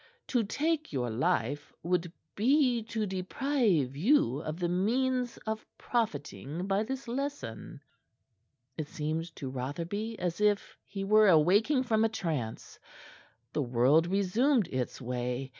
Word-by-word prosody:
"To 245 -3 +2
take 310 +8 -1
your 125 -4 -1
life 130 +4 0
would 175 0 0 0.2
be 250 +1 +3
to 225 -1 -2
deprive 190 - 0
you 150 - +3
of 155 0 -4
the 175 - 0
means 245 +7 0
of 220 0 -3
profiting 180 - -2
by 195 +1 +1
this 260 +3 -4
lesson." 235 - -5 1.0
It 155 - -2
seemed 160 +3 -3
to 135 - -6
Rotherby 170 - -4
as 175 +2 -2
if 210 -1 +1
he 195 -1 -5
were 215 +1 +5
awaking 200 - +4
from 220 -3 +2
a 225 - +3
trance. 155 - -4 0.7
The 150 - 0
world 130 +6 +3
resumed 205 +6 +2
its 130 -2 -3
way. 125 +1 -3
190 Hz, 130 wpm, -30 LUFS, 145-230 Hz, 1.0 s, were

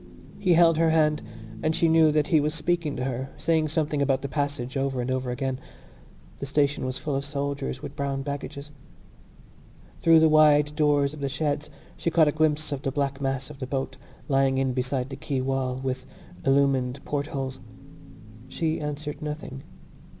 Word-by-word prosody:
He 180 -4 +3
held 165 -1 +5
her 165 -1 +4
hand 155 -1 +3 0.4
and 155 +6 +1
she 165 - +3
knew 160 -1 +5
that 150 -1 +2
he 160 - +5
was 150 +2 0
speaking 165 -1 0
to 125 - -3
her, 130 +1 -3
saying 160 -1 +1
something 150 -2 0
about 135 -1 +1
the - - -1
passage 140 -3 -2
over 135 -1 -1
and 125 +1 -1
over 130 -1 -1
again. 130 +1 -2 0.8
The 140 - -4
station 140 -1 +1
was 130 0 -3
full 145 -3 -3
of 135 - -1
soldiers 140 -2 -3
with 140 - -7
brown 140 -1 -2
baggages. 140 0 -6 1.3
Through 165 -1 +7
the 160 - +6
wide 150 -1 +5
doors 145 -2 +2
of 155 - -9
the 140 -1 -2
sheds 145 +1 -2 0.3
she - - 0
caught 160 -1 +4
a - - +3
glimpse 155 0 +1
of 140 -2 -3
the 135 - -2
black 140 0 -2
mass 135 +1 -2
of 145 - -12
the 130 - -4
boat, 135 0 -3 0.3
lying 135 -1 +2
in 130 -1 +1
beside 130 +1 -1
the 135 - -6
quay 135 0 -3
wall, 130 -1 -1
with 130 0 -4 0.4
illumined 135 -1 +2
portholes. 135 -2 -3 0.9
She 160 +3 -1
answered 150 0 -5
nothing. 150 -3 -5
140 Hz, 180 wpm, -26 LUFS, 135-150 Hz, 1.3 s, Through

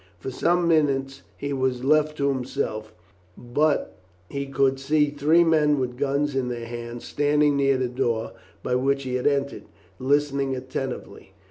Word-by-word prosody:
For 130 - -6
some 175 +6 +1
minutes 140 -4 +1 0.2
he 140 0 -3
was 130 -2 -1
left 155 +2 +2
to 140 - +1
himself, 125 -5 -3 0.5
but 120 - 0 0.3
he 140 0 -3
could 135 0 +1
see 150 +1 +2
three 150 +4 +4
men 150 -3 +3
with 125 -1 -2
guns 140 +1 0
in 130 -2 0
their 120 -1 -4
hands 120 0 -7
standing 145 0 +2
near 135 -1 +3
the 130 -1 0
door 120 -3 -1 0.3
by - - -1
which 135 +2 +1
he 130 -1 -4
had 125 +1 0
entered, 140 -1 -1 0.3
listening 140 0 +1
attentively. 130 -5 -6
135 Hz, 155 wpm, -24 LUFS, 125-145 Hz, 0.5 s, three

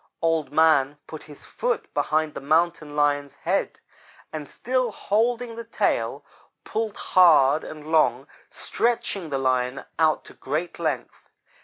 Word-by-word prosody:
"Old 165 -2 0
man 150 -2 +3
put 155 - -9
his 145 -2 -13
foot 465 -3 -3
behind 155 -1 0
the - - -7
Mountain 155 0 +1
lion's 145 -1 +1
head, - - -2 0.5
and, 150 -2 -6
still 255 -1 -1
holding 230 +4 0
the 230 - -6
tail, 230 - -1 0.4
pulled 220 -1 -3
hard 155 -5 +5
and 155 -1 -9
long, 140 -5 +2 0.2
stretching 225 -7 -2
the 140 - -1
Lion 130 0 0 0.2
out 155 -1 +2
to - - -13
great 155 +7 -4
length. 160 -3 -4
155 Hz, 135 wpm, -24 LUFS, 145-205 Hz, 0.5 s, hard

